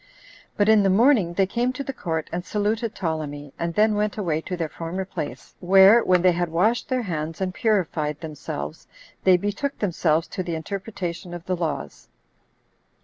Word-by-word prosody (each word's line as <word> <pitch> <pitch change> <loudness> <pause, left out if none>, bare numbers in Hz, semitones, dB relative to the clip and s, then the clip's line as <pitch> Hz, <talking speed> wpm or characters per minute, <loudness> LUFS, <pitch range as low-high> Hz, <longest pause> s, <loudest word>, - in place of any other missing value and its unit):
But 205 - +3
in 220 -1 +6
the 195 - +3
morning 210 -3 +4
they 195 - +3
came 240 +6 0
to 275 - -4
the 270 - -5
court 160 -9 -3
and 175 +1 -2
saluted 215 +3 -1
Ptolemy, 150 -5 -4
and 170 -1 -2
then 215 +1 +4
went 210 0 -1
away 165 -6 -1
to 180 +2 -5
their 165 -2 -1
former 170 +4 -5
place, 190 - -6
where, 195 +5 +7
when 180 -1 +3
they 185 - +6
had 175 0 -1
washed 210 +9 +1
their 255 -2 0
hands, 160 -4 -4
10 190 - -1
and - - -9
purified 165 -9 0
themselves, 140 - -6 0.4
they 185 -1 +6
betook 205 +9 -3
themselves 165 -5 +1
to - - -4
the 175 -2 -3
interpretation 175 0 -5
of 175 0 -9
the 185 - 0
laws. 165 -4 -4
185 Hz, 185 wpm, -24 LUFS, 165-210 Hz, 0.4 s, where